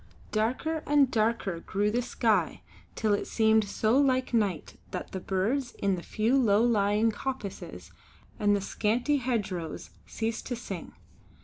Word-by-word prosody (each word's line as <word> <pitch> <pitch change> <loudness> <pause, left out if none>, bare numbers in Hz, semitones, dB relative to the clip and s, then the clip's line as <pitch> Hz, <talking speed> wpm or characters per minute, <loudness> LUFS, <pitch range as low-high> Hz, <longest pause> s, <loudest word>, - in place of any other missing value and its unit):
Darker 255 +9 0
and 285 -3 +4
darker 215 -6 0
grew 205 +4 -1
the 240 +3 +1
sky, 230 -3 0 0.3
till 215 -2 +1
it 205 - -1
seemed 220 -1 +3
so 220 +5 +2
like 260 -3 +2
night 200 -9 -1
that 180 - -6
the 190 - -4
birds 215 +9 -1
in 200 -1 0
the 180 - -3
few 220 +7 0
low 215 -3 +4
lying 215 -1 +3
coppices 215 -2 -6 0.5
and 205 -1 +3
the 200 - -1
scanty 235 +8 0
hedgerows 205 - -3 0.2
ceased 225 0 -3
to 245 - -2
sing. 195 -7 -7
220 Hz, 145 wpm, -28 LUFS, 200-245 Hz, 0.5 s, and